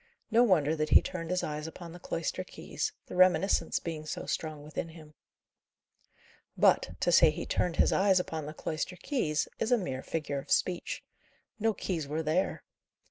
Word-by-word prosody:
No 230 +2 +5
wonder 160 -10 +3
that 155 0 -1
he - - +8
turned 165 -3 -5
his 180 0 0
eyes 150 +1 -3
upon 165 +1 -9
the 175 - -10
cloister 165 -2 -3
keys, - - -4
the - - -8
reminiscence 185 +1 +3
being 155 -2 -6
so - - -4
strong 155 -2 -3
within 155 +2 -5
him. 155 -2 -13 1.4
But, 90 - +3
to 175 - +2
say 165 -1 +7
he 150 - -4
turned 175 -2 0
his - - +3
eyes 190 -1 +4
upon 160 -4 -4
the 155 - -6
cloister 160 +4 -3
keys, 180 - -1
is 225 - -1
a 245 - +6
mere 135 - -3
figure 150 -3 -3
of - - -11
speech. 180 -1 0 0.6
No 220 0 +1
keys 165 -6 -3
were 155 +3 -2
there. 160 +5 0
165 Hz, 180 wpm, -30 LUFS, 155-185 Hz, 1.4 s, he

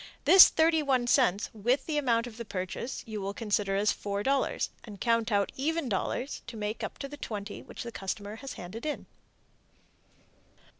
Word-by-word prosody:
This 380 -1 +10
31 305 -6 +2
cents 240 -5 +2
with 240 +5 +1
the 305 -2 0
amount 235 -4 +2
of 230 -2 -9
the 235 - -5
purchase 185 +5 -4
you 215 -2 -5
will 200 +1 -4
consider 205 -3 0
as 200 +1 +2
$4.00, 205 +7 -1
and 205 -4 -10
count 230 -1 +1
out 200 -1 +2
even 315 +2 -1
dollars 240 +6 -2
to 235 -1 -7
make 210 +1 -3
up - - -5
the 275 - -5
$20.00 215 -8 -6
which - - -7
the 235 - -6
customer 205 +1 -5
has 270 +3 -7
handed 185 +6 -8
in. 300 -1 -3
230 Hz, 165 wpm, -29 LUFS, 205-270 Hz, -, This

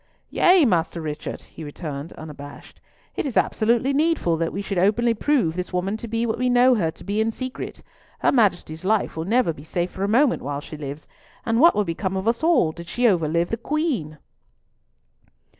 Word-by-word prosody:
"Yea, 360 -3 +5
Master 170 -5 +1
Richard," 150 -2 -5
he 160 - -12
returned, 145 0 -6
unabashed. 145 -2 -11 0.3
"It - - -1
is 275 -5 -3
absolutely 235 +5 +2
needful 300 - +2
that 165 0 -1
we 200 - -4
should 195 -2 -2
openly 230 +5 +3
prove 230 - +1
this 180 0 -4
woman 185 +3 -1
to 235 - -7
be 230 +1 -1
what 225 0 -2
we 250 0 +1
know 250 +1 +5
her 185 -9 +1
to - - -11
be 205 +2 -1
in 220 - +1
secret. 255 +3 -6 0.3
Her - - +2
Majesty's 185 -8 +1
life 210 +2 +1
will 160 0 -3
never 220 -3 +2
be 145 - -12
safe 175 +3 -2
for 190 - -5
a - - +1
moment 250 +4 +3
while 140 +1 -3
she 155 - -9
lives; 145 0 -7 0.4
and 225 0 +1
what 335 +5 +6
would 210 - +1
become 190 +3 -2
of 190 +3 -3
us 230 0 +1
all 320 - +3
did 170 +1 -10
she 245 - -3
overlive 170 -3 +1
the 225 - -2
Queen!" 245 - -2
200 Hz, 200 wpm, -23 LUFS, 165-240 Hz, 0.4 s, what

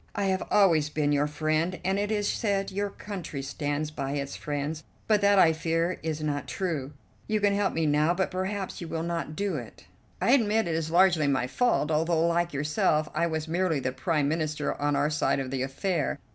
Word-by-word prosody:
I 205 - -1
have 190 -1 +1
always 165 -7 +4
been 150 -1 0
your 145 0 +2
friend, 155 +4 -1
and 190 +1 +1
it 205 +1 -1
is 205 -1 0
said 200 -3 0
your 200 +1 -1
country 180 -9 -6
stands 145 +2 -3
by 140 -2 -3
its 140 -1 -3
friends; 150 +1 -4 0.2
but 210 -2 +3
that, 200 0 +4
I 165 -4 +6
fear, 165 +2 -1
is 155 -1 -3
not 145 -1 -2
true. 155 -7 -3 0.3
You 215 0 +1
can 205 -1 +3
help 200 -1 +1
me 165 0 +1
now, 150 +3 +3
but 190 +1 -1
perhaps 190 +1 -3
you 170 - -5
will 160 0 -3
not 170 -2 -3
do 200 -3 -1
it." 120 -4 -10 0.3
"I 235 - +2
admit 225 -5 +3
it 165 - -1
is 160 -1 -1
largely 170 -3 +4
my 135 -3 +1
fault, 160 - +1
although, 165 +1 +2
like 170 0 +1
yourself, 150 +1 +1
I 170 - +1
was 160 -1 -3
merely 170 -2 +1
the 130 -1 -2
Prime 140 +3 0
Minister 155 0 -1
on 145 0 +1
our 145 +2 +1
side 150 -2 +1
of 130 -1 -4
the 135 -1 -2
affair. 150 +5 -1
160 Hz, 210 wpm, -27 LUFS, 150-190 Hz, 0.3 s, I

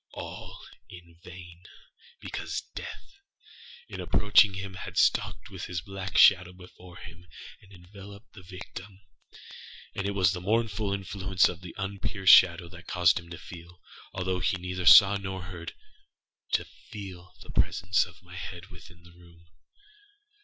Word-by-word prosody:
All - - -8 0.3
in 85 -2 -14
vain; 90 -1 -12 0.5
because - - -5
Death, 395 - -9 0.7
in - - -7
approaching 105 -1 +4
him 95 0 -6
had 95 - -8
stalked - - +1
with - - -7
his 85 -1 -4
black 95 0 -5
shadow 90 -2 +6
before 90 -1 -15
him, 85 0 -13 0.3
and 100 - -20
enveloped 100 +3 -14
the 100 - -13
victim. 95 +1 -11 0.9
And 100 - -3
it 100 - -3
was 95 -2 +3
the 90 - -5
mournful 110 0 0
influence 95 -2 +1
of 85 -1 -7
the 90 -2 -10
unperceived 95 0 -2
shadow 85 -1 +7
that 85 0 -14
caused 90 -2 +3
him 85 -1 -14
to 85 - -8
feelâalthough 90 +2 -7
he - - +1
neither 90 0 -4
saw 100 0 +9
nor 95 -1 -6
heardâto 90 -2 -7 0.2
feel 95 -4 -10
the - - -12
presence 95 +3 +1
of 90 +1 -18
my 90 0 -13
head 90 +2 -8
within 90 -1 -15
the 85 - -17
room. 85 -1 -20
90 Hz, 145 wpm, -28 LUFS, 90-95 Hz, 0.9 s, saw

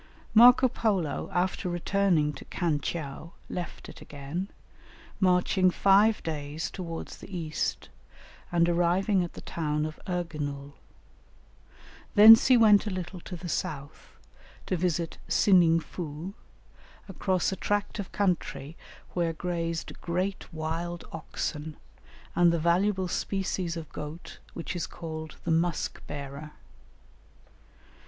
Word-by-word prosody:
Marco 245 +3 +8
Polo 200 - -1
after 180 0 0
returning 175 -3 +1
to 135 - -10
Khan 165 -5 -1
tcheou 155 +1 -5 0.2
left 175 -3 -6
it - - -12
again, 145 +7 -5 0.7
marching 185 0 +3
five 200 +4 +4
days 150 0 -4
towards 165 -3 -6
the - - -12
east, 155 -3 -3 0.6
and 170 -1 +3
arriving 175 +3 +2
at 175 - -6
the - - -9
town 150 -2 -2
of 155 0 -6
Erginul. 150 -6 -4 1.4
Thence 220 +2 +10
he 255 -1 +7
went 215 -2 +6
a - - +1
little 185 -1 -5
to 180 - -8
the 175 +1 -7
south 140 -3 -5 0.5
to - - -1
visit 170 -1 -1
Sining 175 -4 +5
foo, 165 +2 -6 0.7
across 185 -1 0
a - - -2
tract 205 +2 -1
of 200 - -5
country 175 -6 -1 0.4
where 170 -2 0
grazed 165 -1 -4
great 185 +3 -2
wild 165 +2 -4
oxen 155 -1 -5 0.6
and 175 -1 +5
the 170 - +1
valuable 185 +4 +2
species 185 -2 -2
of 160 -2 -6
goat 150 +3 -8 0.2
which 170 +2 -5
is 175 - -2
called 160 -2 -7
the 170 - -1
"musk 165 +1 0
bearer." 145 +1 -7
170 Hz, 120 wpm, -28 LUFS, 155-185 Hz, 1.4 s, Thence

